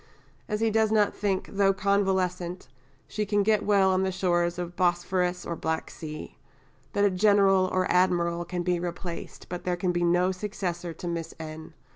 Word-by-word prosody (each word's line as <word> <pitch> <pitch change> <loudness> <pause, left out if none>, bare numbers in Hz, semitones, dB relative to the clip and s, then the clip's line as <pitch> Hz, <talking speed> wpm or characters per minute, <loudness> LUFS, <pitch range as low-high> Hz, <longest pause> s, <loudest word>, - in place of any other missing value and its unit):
as 210 +1 -1
he 225 -1 +2
does 220 0 +2
not 210 -2 +3
think, 195 -2 -1
though 195 -1 +2
convalescent, 190 -3 0 0.4
she 215 - -2
can 205 0 +1
get 215 0 +2
well 195 -2 +4
on 185 0 +2
the 190 0 0
shores 175 -2 0
of 175 0 -5
Bosphorus 180 0 0
or 170 - -3
Black 160 0 -3
Sea; 155 -1 -8 0.6
that 205 0 +3
a 200 - +3
General 195 -1 +4
or 185 0 +1
Admiral 175 -1 +2
can 175 0 -4
be 180 0 +1
replaced, 175 0 -6
but 175 0 -6
there 180 -1 -1
can 180 0 0
be 175 0 0
no 180 +2 +3
successor 185 -3 -4
to 165 +2 -7
Miss 170 -1 -4
N. 155 0 -8
180 Hz, 180 wpm, -27 LUFS, 175-195 Hz, 0.6 s, well